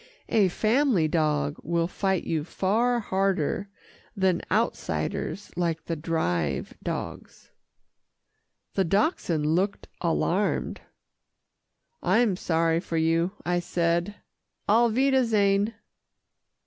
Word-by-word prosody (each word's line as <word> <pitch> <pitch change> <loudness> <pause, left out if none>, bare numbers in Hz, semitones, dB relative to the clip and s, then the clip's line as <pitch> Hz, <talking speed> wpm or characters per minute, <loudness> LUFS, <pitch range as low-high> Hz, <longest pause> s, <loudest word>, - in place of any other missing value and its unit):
A 210 -4 +4
family 220 - +2
dog 150 -2 0
will 170 +1 0
fight 190 0 -1
you 160 -2 -1
far 225 +8 +1
harder 195 -2 0 0.5
than 190 -3 +2
outsiders 210 -1 -1
like 165 -3 -1
the 165 - -2
Drive 90 - -1
dogs." - - -6 1.2
The 195 - +2
Dachshund 180 - +1
looked 180 +6 0
alarmed. 180 +3 0 1.2
"I'm 225 -4 +3
sorry 165 -2 +1
for 170 -2 -4
you," 165 +3 +2
I 175 0 +1
said, 170 +3 0 0.5
"auf 230 +2 +4
wiedersehen." 225 -5 +2
180 Hz, 95 wpm, -26 LUFS, 165-205 Hz, 1.2 s, A